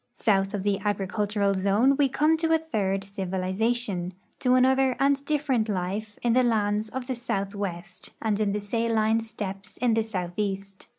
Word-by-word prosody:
South 195 -2 +1
of 195 - -3
the 200 -1 +1
agricultural 205 0 0
zone 200 +8 +3
we 280 -1 +3
come 300 +4 +3
to 325 0 0
a 325 - +6
third 200 -12 -1
civilization, 190 0 -1 0.3
to 255 -1 +3
another 260 0 +4
and 275 0 +2
different 275 -7 0
life, 205 +3 -3
in 240 -1 +3
the 255 - +5
lands 215 -2 +1
of 260 +1 -5
the 260 - -2
southwest 200 -6 -4
and 215 -2 0
in 210 -2 +1
the 210 - -1
saline 225 +1 +1
steppes 205 -3 -7
in 240 -1 +2
the 225 - +3
southeast. 195 -1 -4
215 Hz, 165 wpm, -26 LUFS, 195-245 Hz, 0.3 s, a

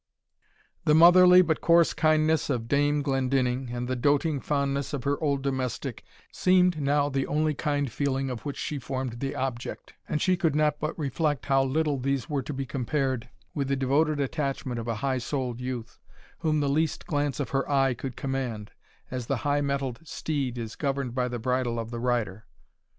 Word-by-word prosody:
The 150 - +5
motherly, 180 +2 +8
but 160 -2 0
coarse 170 -1 +4
kindness 155 -1 +2
of 120 -4 -1
Dame 145 +2 +2
Glendinning, 130 -2 0
and 120 0 -4
the 130 - -1
doating 145 +3 +1
fondness 140 0 -1
of 140 - -3
her 140 +2 -1
old 140 -3 0
domestic, 130 -3 -3 0.3
seemed 180 -3 +3
now 145 +1 +2
the 135 -1 -1
only 155 +1 +1
kind 145 -3 -1
feeling 135 0 -1
of 120 - -6
which 145 -2 -5
she 150 - -3
formed 130 -2 -4
the 135 +1 -3
object; 130 -2 -4 0.2
and 150 - 0
she 185 +4 +3
could 165 -5 +1
not 150 -1 +2
but 155 - -3
reflect 145 -1 -1
how 135 -1 +3
little 145 +1 0
these 135 0 -1
were 145 -3 -1
to 130 - -6
be 135 -1 -3
compared 130 -1 -2 0.2
with 140 -3 -2
the 140 - +1
devoted 145 +3 +1
attachment 135 -3 -2
of 115 - -6
a 115 - -1
high 130 -2 +1
souled 125 -1 -3
youth, 125 -2 -5 0.4
whom 155 -2 +1
the 145 - +1
least 155 +3 0
glance 145 -3 -1
of 145 - -3
her 135 +1 0
eye 135 -2 +3
could 125 +1 -6
command, 125 -6 -3 0.4
as 125 -2 -4
the 140 - 0
high 145 0 +2
mettled 140 -3 -2
steed 140 -6 -3
is 115 -2 -5
governed 135 -4 -2
by 125 -1 0
the 120 -1 -4
bridle 125 0 -1
of 115 0 -4
the 120 - -4
rider. 115 -4 -1
135 Hz, 190 wpm, -27 LUFS, 125-150 Hz, 0.4 s, motherly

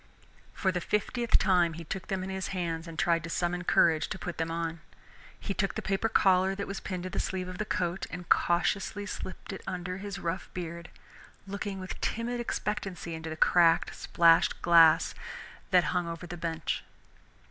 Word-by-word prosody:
For 190 - +1
the 180 -1 -2
fiftieth 230 +5 +1
time 180 -3 +3
he 165 +1 -7
took 185 +4 -5
them 190 -2 -2
in 190 - -4
his 190 -1 -3
hands 170 -3 -3
and 165 -1 -8
tried 170 -2 +2
to 170 - -6
summon 175 +1 -1
courage 165 -3 +4
to - - -4
put 180 -3 -6
them 165 0 0
on. 165 0 -3 0.6
He 200 - -3
took 195 0 -1
the - - -2
paper 195 +3 0
collar 190 -1 +4
that 200 - -3
was 195 0 -5
pinned 185 -2 -5
to 185 - -5
the - - -2
sleeve 185 -1 -2
of 185 +1 -7
the 210 - -1
coat 185 -3 -1
and 175 -1 -7
cautiously 195 +4 +1
slipped 195 -1 -6
it 195 - -7
under 180 0 -3
his 200 0 -5
rough 170 +1 -3
beard, 170 -1 -5 0.6
looking 200 0 -4
with 185 0 -7
timid 240 +2 -1
expectancy 195 -7 -3
into 160 0 -5
the 160 - -5
cracked, 170 0 +4
splashed 165 -1 +4
glass 165 -2 +6 0.6
that 180 -3 +5
hung 180 -1 0
over 170 +1 -5
the 175 0 -6
bench. 165 -2 -3
180 Hz, 190 wpm, -29 LUFS, 170-195 Hz, 0.6 s, glass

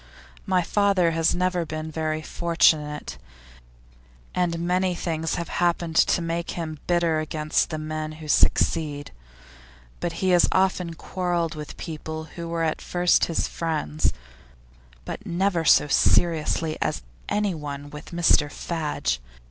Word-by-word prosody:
My 185 -2 +2
father 195 -2 +2
has 165 +1 +2
never 180 -1 +1
been 155 0 -5
very 155 0 -2
fortunate, 155 - +1 1.1
and 175 -2 0
many 180 +2 +1
things 160 -2 -2
have 170 - -3
happened 170 -1 0
to 175 - +4
make 170 +1 -2
him 155 -3 -4
bitter 170 -2 +2
against 155 -1 0
the 160 - -3
men 155 0 -4
who 155 0 -10
succeed; 150 -1 +2 1.0
he 185 +3 -1
has 175 -1 +5
often 185 -3 +1
quarrelled 175 -2 -2
with 150 -2 -8
people 160 -1 -6
who 170 -1 -5
were 165 0 -1
at 160 -1 -1
first 175 0 +3
his 165 - -1
friends, 155 -2 -1 0.9
but - - -6
never 180 -2 0
so 150 - +6
seriously 160 +1 +2
with - - -1 0.3
anyone 150 -9 -2
as 145 - -12
with 150 - -9
Mr 170 -4 +3
Fadge. 155 - -2
165 Hz, 130 wpm, -25 LUFS, 155-175 Hz, 1.1 s, so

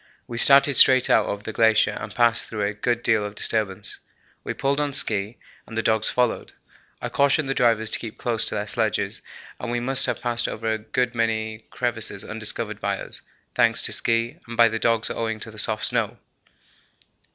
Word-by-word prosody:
We 115 -1 -6
started 140 +1 +6
straight 130 -1 +6
out - - +3
over 100 0 -5
the 110 - -6
glacier 110 -1 +3
and 105 0 -8
passed 120 -1 +2
through 105 -2 -4
a 100 - -2
good 120 +3 -2
deal 110 -2 +2
of 105 0 -7
disturbance. 105 -2 -2 0.4
We - - -5
pulled 140 +1 -1
on 145 -1 -1
ski 105 -4 -1 0.3
and 115 - -9
the 115 - -1
dogs 110 -1 +2
followed. 125 -2 -1 0.5
I - - -5
cautioned 140 +1 +1
the 135 - -1
drivers 115 -4 +1
to - - +1
keep 115 -2 -8
close 115 -2 -1
to - - -2
their 105 0 -3
sledges 105 - -2 0.4
and 120 - -5
we 120 0 -1
must 130 +2 +4
have - - -2
passed 120 -1 -1
over 110 0 -3
a 110 - -4
good 125 +3 -2
many 110 -1 -2
crevasses 115 -4 -2
undiscovered 105 0 -3
by 100 -1 -2
us, - - -9 0.3
thanks - - +3
to - - +4
ski, 115 +7 +1
and 115 0 -8
by 115 -1 +6
the 110 0 -4
dogs 115 -1 +1
owing 115 -1 -3
to 110 - -4
the 110 - -8
soft 110 +1 +4
snow. - - -1
115 Hz, 200 wpm, -23 LUFS, 110-120 Hz, 0.5 s, started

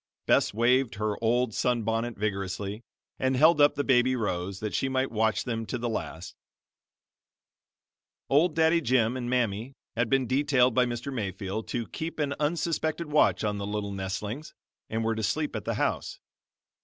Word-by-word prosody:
Bess - - +3
waved 120 +3 +2
her 105 +1 -2
old 120 0 +2
sun 120 0 +1
bonnet 115 +2 -1
vigorously, 100 0 -3 0.4
and 130 0 +1
held 155 +3 +5
up 145 - +5
the 145 - 0
baby 130 -1 +3
Rose, 95 -4 -2
that 105 -1 -4
she 135 - 0
might 130 0 0
watch 110 -1 +1
them 115 -3 -3
to - - -2
the 120 0 -3
last. 95 -6 -5 1.9
Old 155 +4 +3
Daddy 160 +1 +4
Jim 125 -3 +2
and 120 -2 -3
Mammy 120 0 -1 0.2
had 115 0 0
been 135 +1 +2
detailed 130 -1 +3
by 125 +1 +3
Mr. 120 +3 -4
Mayfield 100 -1 -4
to 120 -1 -2
keep 165 +1 -5
an 145 -2 0
unsuspected 160 0 -1
watch 150 - +3
on 105 -1 -1
the 100 - -4
little 105 -1 -3
nestlings, 100 +8 -5 0.3
and 110 +1 -1
were 115 0 +1
to 110 - -3
sleep 150 +8 -1
at - - -4
the - - -1
house. - - -1
120 Hz, 170 wpm, -28 LUFS, 105-135 Hz, 1.9 s, held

